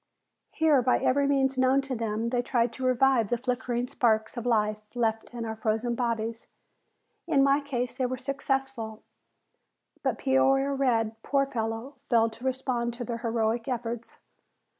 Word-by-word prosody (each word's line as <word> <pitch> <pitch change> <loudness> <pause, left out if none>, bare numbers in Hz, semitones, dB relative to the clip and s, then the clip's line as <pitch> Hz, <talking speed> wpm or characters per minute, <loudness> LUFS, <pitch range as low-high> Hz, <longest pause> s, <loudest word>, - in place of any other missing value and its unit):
Here 310 -4 +3
by 250 +1 +3
every 280 +2 +2
means 270 -1 +2
known 260 +1 +4
to 270 -1 -4
them 225 0 -2
they 245 -1 +2
tried 240 -1 0
to 260 - -7
revive 255 -3 +3
the 240 - +1
flickering 245 0 -2
sparks 220 -4 +1
of 240 0 -4
life 215 -2 +1
left 225 -2 0
in 235 -1 -5
our 220 0 -4
frozen 225 +2 -1
bodies. 230 -1 -2 0.8
In 285 -5 +4
my 275 +1 +4
case 250 -3 -3
they 255 -1 0
were 255 +1 -3
successful, 270 -4 -3 1.0
but - - 0
Peoria 270 +1 +3
Red, 225 -5 0
poor 275 +2 +1
fellow, 230 +2 -4
failed 230 -2 +3
to 235 - -13
respond 250 -2 -1
to 245 - -5
their 235 -1 -4
heroic 230 0 0
efforts. 235 -2 -4
245 Hz, 160 wpm, -28 LUFS, 225-265 Hz, 1.0 s, known